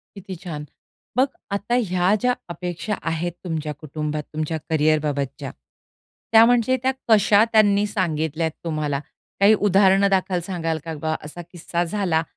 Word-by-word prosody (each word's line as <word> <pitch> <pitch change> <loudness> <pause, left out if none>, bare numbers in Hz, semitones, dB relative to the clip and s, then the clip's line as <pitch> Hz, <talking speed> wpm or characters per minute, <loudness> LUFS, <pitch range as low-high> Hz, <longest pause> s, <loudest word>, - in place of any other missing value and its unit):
किती 190 -1 -8
छान. 150 -4 -5 0.5
मग 265 - +5 0.3
आता 205 +4 -1 0.2
ह्या 185 +2 +3
ज्या 250 0 +2
अपेक्षा 175 +4 -4 0.2
आहेत 170 +1 -2
तुमच्या 155 -3 -3
कुटुंबात 150 +1 -4
तुमच्या 155 +1 -2
कॅरियरबाबतच्या. 150 -3 0 0.8
त्या 225 0 +8
म्हणजे 245 +1 +3
त्या 265 +1 +2 0.2
कशा 215 0 +5
त्यांनी 205 -1 +4
सांगितल्यात 160 -5 -1
तुम्हाला? 150 -3 -2 0.4
काही 205 +2 +7
उदाहरण 195 0 +4
दाखल 185 -2 +1
सांगाल 165 -4 -2
का 165 -1 -5
बा? 155 0 0
असा 175 +3 -8
किस्सा 175 0 -2
झाला 175 -3 0
175 Hz, 135 wpm, -22 LUFS, 155-200 Hz, 0.8 s, त्या